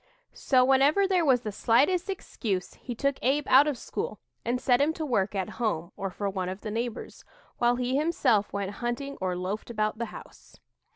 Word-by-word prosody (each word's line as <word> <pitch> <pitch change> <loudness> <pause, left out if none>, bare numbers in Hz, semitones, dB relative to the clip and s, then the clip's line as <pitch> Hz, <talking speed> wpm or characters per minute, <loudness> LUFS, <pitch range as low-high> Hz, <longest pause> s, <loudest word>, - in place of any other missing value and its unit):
So, 255 -2 +3
whenever 275 +9 +4
there 370 -3 +2
was 260 -5 +4
the 215 - -4
slightest 290 - +2
excuse, 205 - -3
he 245 - -7
took 275 +3 0
Abe 275 +3 +1
out 275 +3 +7
of 290 -4 -1
school 215 - -5 0.2
and 240 +2 -1
set 250 0 +3
him 305 +3 +2
to 320 -1 -4
work 210 -7 0
at 190 -2 -1
home 170 -7 -1
or 195 - -3
for 200 +2 -4
one 190 -2 -2
of 190 +2 -6
the 215 - -5
neighbors, 235 +2 -4 0.4
while 240 0 +3
he 250 +1 -1
himself 285 -10 +2
went 200 -1 -3
hunting 250 +4 -3
or 185 -1 -1
loafed 185 +6 -4
about 215 -1 -1
the 235 - -1
house. - - -13
240 Hz, 195 wpm, -28 LUFS, 205-275 Hz, 0.4 s, out